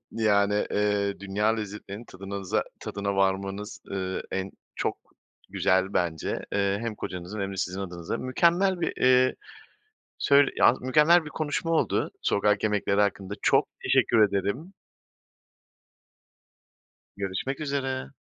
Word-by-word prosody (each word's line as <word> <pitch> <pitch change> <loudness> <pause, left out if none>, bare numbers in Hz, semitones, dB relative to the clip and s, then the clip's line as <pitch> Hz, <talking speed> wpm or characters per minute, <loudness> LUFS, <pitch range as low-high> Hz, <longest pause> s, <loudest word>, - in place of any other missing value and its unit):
Yani, 105 -2 +2
eee, 105 -1 0
dünya 100 +2 -1
lezzetlerinin 105 +1 -6
tadınaza 95 -1 -3 0.2
tadına 100 0 -3
varmanız, 95 +2 -1
ııı, 95 -1 -3
en 95 0 -3 0.2
çok - - -2 0.5
güzel 95 +1 +1
bence. 85 -3 -1 0.2
Eee, 100 0 +1
hem 115 -2 -3
kocanızın 90 +2 -6
hem 100 0 -2
de - - -7
sizin 95 +1 -2
adınıza. 90 -3 -4
Mükemmel 175 +8 +2
bir, - - 0
eee, 130 0 +5 0.8
söyl 140 0 +5
yalnız 125 - +4
mükemmel 155 +6 +4
bir 155 - -6
konuşma 155 +2 -2
oldu 165 - +1
sokak 100 0 +2
yemekleri 105 -1 +1
hakkında. 100 -1 -1
Çok - - +3 0.2
teşekkür 115 -2 +3
ederim. 100 - -3 2.4
Görüşmek 100 +9 -3
üzere. 135 -2 -2
100 Hz, 120 wpm, -27 LUFS, 95-130 Hz, 2.4 s, eee